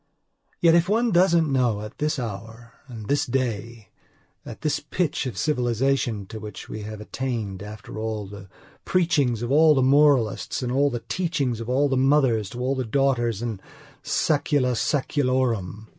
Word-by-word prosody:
Yet, 165 -1 +6
if 170 +1 +3
one 230 +2 +2
doesn't 170 -4 +3
know 125 -5 +2
that 105 +1 -7
at - - -34
this 150 0 0
hour 115 +1 -7
and 115 -5 -9 0.2
day, 115 -4 -3 0.5
at 115 - -10
this 155 -2 0
pitch 165 -6 -2
of 125 - -6
civilization 125 -5 0
to 110 +3 -8
which 105 -2 -9
we 110 - -6
have 105 0 -7
attained, 110 -5 -4
after 105 +1 -8
all 110 -1 -3
the 100 -1 -11 0.3
preachings 145 -10 +1
of 120 - -3
all 155 +1 +6
the 130 - +3
moralists, 135 -3 +3
and 125 - -2
all 140 +2 +3
the 120 -3 -4
teachings 145 -10 -1
of 115 +1 -6
all 135 +3 +2
the 135 -1 0
mothers 130 -6 +2
to 120 - -8
all 130 +2 0
the 130 -1 -2
daughters 120 -3 0
in 110 -5 -4 0.4
saecula 145 -4 +1
saeculorum... 125 - 0
125 Hz, 165 wpm, -24 LUFS, 110-145 Hz, 0.5 s, Yet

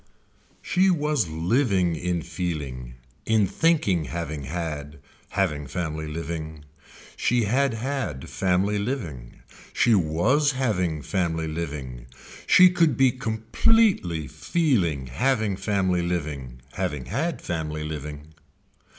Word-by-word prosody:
She 190 +1 +3
was 150 - +1
living 90 - +1
in 85 0 -2
feeling, 75 -8 -4 0.3
in 110 -2 +4
thinking 100 - +2
having 80 -3 -4
had, 75 -2 -4 0.3
having 75 -7 -1
family 80 0 -3
living. 80 -1 -5 0.5
She 120 -1 +1
had 130 +4 +1
had 110 - -3
family 95 +2 +1
living. 85 - -5 0.3
She 120 - +4
was 110 - +2
having 90 - 0
family 80 -1 -1
living. 70 -7 -5 0.4
She 185 -1 +8
could 170 -3 +2
be 130 -1 +5
completely 115 - +1
feeling 90 - 0
having 110 - 0
family 95 -2 0
living, 75 -8 -4
having 75 -4 -3
had 165 +4 -2
family 80 -3 -3
living. 75 0 -7
85 Hz, 105 wpm, -25 LUFS, 75-120 Hz, 0.5 s, She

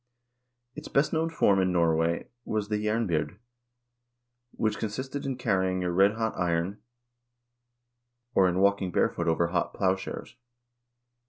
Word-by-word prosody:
Its 150 +3 -8
best 140 +2 +1
known 160 +1 +1
form 100 -11 +3
in 95 0 +1
Norway 85 -1 +1 0.2
was 105 -2 -2
the 105 0 -1
jernbyrd, 105 -4 0 1.1
which 110 -3 -2
con 110 - -2
sisted 130 +5 -5
in 135 -2 -2
carrying 95 -5 0
a 90 - -1
redhot 105 +5 +2
iron, 90 +3 -1 1.5
or 95 -4 +4
in 90 - -1
walking 100 -1 +2
barefooted 85 - +1
over 85 +1 +1
hot 90 - -1
plowshares. 95 +4 -2
100 Hz, 130 wpm, -28 LUFS, 90-110 Hz, 1.5 s, or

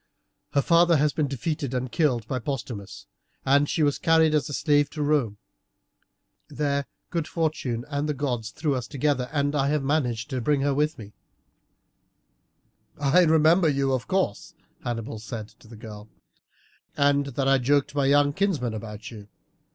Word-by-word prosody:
Her 140 - +2
father 170 -1 +4
has 145 0 +2
been 150 -2 0
defeated 140 0 -3
and 125 -1 -3
killed 125 -9 +1
by 130 - -2
Postumius, 120 -6 -6 0.4
and 140 +2 +3
she 160 - +1
was 145 -1 +1
carried 160 -1 +4
as 150 0 +1
a - - -6
slave 145 +2 +2
to 150 0 -4
Rome. 140 -9 +1 1.1
There 140 -1 -1 0.2
good 165 -3 -2
fortune 140 -8 -2
and 145 +1 -2
the 150 - -1
gods 125 -5 -2
threw 150 -3 -2
us 125 -2 -3
together, 140 -3 -1
and 145 -1 0
I 140 -2 +1
have 150 0 0
managed 135 -4 -1
to 130 -1 -2
bring 145 +3 +1
her 140 0 +1
with 150 +3 0
me." 105 -2 -11 1.9
"I 145 +6 +4
remember 160 +2 +4
you, 135 -1 +1
of 130 -2 -2
course," 190 - -1 0.3
Hannibal 115 -2 -4
said 110 -1 -7
to - - -21
the 115 0 -12
girl, 105 -1 -10 0.9
"and 140 0 +3
that 135 0 -2
I 135 0 +4
joked 140 +3 +1
my 140 -2 +1
young 145 0 +4
kinsman 150 - 0
about 110 0 -7
you. 105 -3 -11
140 Hz, 165 wpm, -25 LUFS, 120-150 Hz, 1.9 s, father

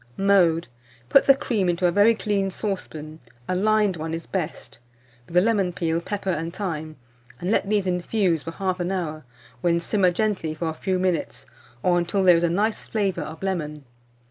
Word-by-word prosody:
Mode. 180 -4 +3 0.4
Put - - +5
the 275 - +8
cream 220 -9 0
into 175 +1 0
a 175 - +4
very 205 +5 +5
clean 205 -3 0
saucepan 160 -6 -5 0.3
(a - - 0
lined 210 -1 +2
one 160 +1 -3
is 165 - -7
best), 180 -5 -5 0.5
with 170 - -10
the 180 - +7
lemon 200 -4 +2
peel, 165 -1 -1
pepper, 195 +1 -3
and 165 0 -3
thyme, 160 -5 -4 0.4
and 180 +3 -2
let 200 - +1
these 210 -2 +1
infuse 180 -1 0
for 165 - -6
1/2 185 0 -2
hour, 155 -6 -3 0.4
when 170 -1 +2
simmer 185 +1 +2
gently 180 -5 -1
for 160 +1 -2
a - - -3
few 185 +3 -1
minutes, 180 -3 -1 0.4
or 175 -1 +3
until 175 +3 0
there 180 -2 +7
is - - 0
a 170 - +2
nice 210 +6 0
flavour 195 -5 -1
of 155 +3 -7
lemon. 150 -6 -3
180 Hz, 185 wpm, -24 LUFS, 165-200 Hz, 0.5 s, the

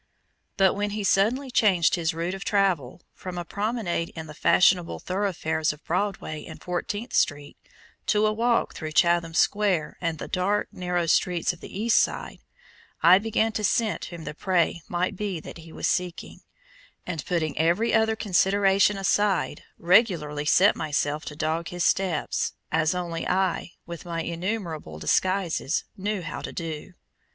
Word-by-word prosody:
But 190 -1 +4
when 205 +1 -1
he 210 - -2
suddenly 235 +8 +2
changed 190 -8 +3
his 170 -2 +1
route 170 +3 -3
of 195 0 -6
travel 180 - 0
from 185 -1 -7
a 175 - -4
promenade 200 -5 -2
in 160 -1 -6
the 150 - -10
fashionable 180 +2 +3
thoroughfares 180 -5 -1
of 150 +1 -13
Broadway 175 -4 -2
and - - -10
Fourteenth 205 +6 -4
Street 145 -1 0 0.5
to 210 0 +3
a 215 - +2
walk 235 +2 +1
through 155 -1 -6
Chatham 170 -1 +3
Square 195 -3 +1
and 165 -2 -1
the - - -6
dark, 195 +3 0
narrow 180 -1 -1
streets 175 +1 +1
of 175 - -14
the 195 - -8
East 230 +2 +4
side, - - -2 0.6
I 180 +3 +8
began 225 +1 0
to 215 -1 -3
scent 215 +2 +1
whom 170 -2 -8
the - - -5
prey 175 0 0
might 180 +2 -1
be 195 -3 -3
that 165 - -10
he 165 0 -12
was - - -4
seeking, 180 -1 -2 0.7
and 165 -5 -4
putting 165 -4 -1
every 175 +9 +2
other 220 0 +3
consideration 195 0 +3
aside, 195 0 +1 0.2
regularly 170 -6 +2
set 190 +6 +5
myself 150 0 -1
to 150 - -7
dog 160 +2 -1
his 175 -1 -3
steps, 190 -3 0 0.2
as 160 +2 +2
only 170 -2 -3
I, 185 -1 0
with 170 +1 -8
my 165 -1 -3
innumerable 170 - -4
disguises, 170 - 0
knew 200 -1 -3
how 155 - -5
to - - -6
do. 165 +1 -6
180 Hz, 160 wpm, -25 LUFS, 165-200 Hz, 0.7 s, I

